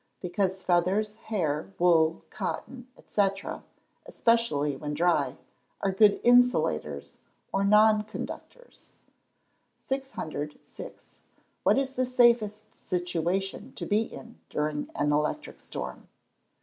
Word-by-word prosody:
_ - - -46
Because 190 +1 -1
feathers, 185 +4 +2 0.2
hair, 165 -4 -1
wool, 165 -2 +3
cotton, 250 -1 -5 0.2
&c., 205 -2 +4 0.8
especially 230 - +1
when 150 +2 -4
dry, 175 +3 +2 0.4
are 195 - +1
good 205 +1 +5
insulators 245 +1 +2 0.3
or 195 - +2
non 210 +1 +5
conductors. - - -9 0.8
606. 160 - -6 0.6
_What - - +4
is 270 -1 0
the 255 -1 0
safest 235 -4 +2
situation 180 +2 -2
to - - -6
be 210 +2 +2
in 230 +1 -9
during 150 0 -2
an 145 0 +1
electric 150 +1 -1
storm? - - -7
195 Hz, 105 wpm, -28 LUFS, 165-230 Hz, 0.8 s, good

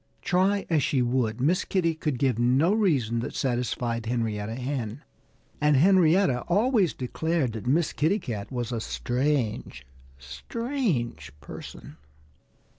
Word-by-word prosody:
Try 195 +3 +2
as 160 -3 +2
she 130 -1 +1
would, 120 -2 0
Miss 170 +9 +2
Kitty 170 -4 0
could 155 -4 -2
give 125 -3 +1
no 130 +10 +3
reason 140 - +1
that 120 - -5
satisfied 120 -2 -1
Henrietta 110 -2 -2
Hen. 125 0 -4 0.6
And 150 -1 +4
Henrietta 175 -4 +4
always 205 - +3
declared 140 0 -1
that 110 +1 -6
Miss 155 +5 +2
Kitty 165 +7 +2
Cat 110 - -6
was 120 -2 -3
a 115 -2 -2
strange, 120 - -2 0.3
strange 160 - -3
person. 70 - -10
130 Hz, 125 wpm, -26 LUFS, 120-170 Hz, 0.6 s, And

